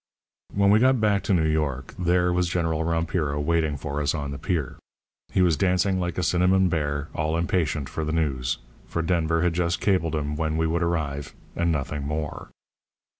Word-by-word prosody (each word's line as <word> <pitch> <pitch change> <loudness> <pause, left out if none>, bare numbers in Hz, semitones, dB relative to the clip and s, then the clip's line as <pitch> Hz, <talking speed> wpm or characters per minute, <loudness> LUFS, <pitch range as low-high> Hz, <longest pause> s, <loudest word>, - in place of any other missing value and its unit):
"When 100 0 +4
we 105 - +6
got 130 +1 +4
back 105 -2 +2
to 100 - +2
New 80 -2 +2
York 75 -5 -1
there 90 0 +2
was 90 0 +1
General 80 -2 0
Rompiro 80 -3 -1
waiting 80 -1 +1
for 75 0 -3
us 70 -1 0
on 70 -2 -3
the 70 - -6
pier. 80 -8 -2 0.5
He 95 - +3
was 85 -3 +4
dancing 95 +2 +2
like 90 -1 -2
a 90 - 0
cinnamon 90 +2 +3
bear, 75 -3 -1
all 80 +1 -1
impatient 85 -4 0
for 80 +5 -4
the 75 - -2
news, 70 -7 0 0.3
for 85 - -2
Denver 85 -1 +1
had 90 -1 +2
just 85 0 0
cabled 85 -6 +1
him 75 0 -2
when 80 0 -1
we 80 - +1
would 85 +2 0
arrive 80 -5 -2 0.2
and 85 0 +1
nothing 75 -1 -2
more. 75 +1 -4
80 Hz, 190 wpm, -25 LUFS, 75-90 Hz, 0.5 s, we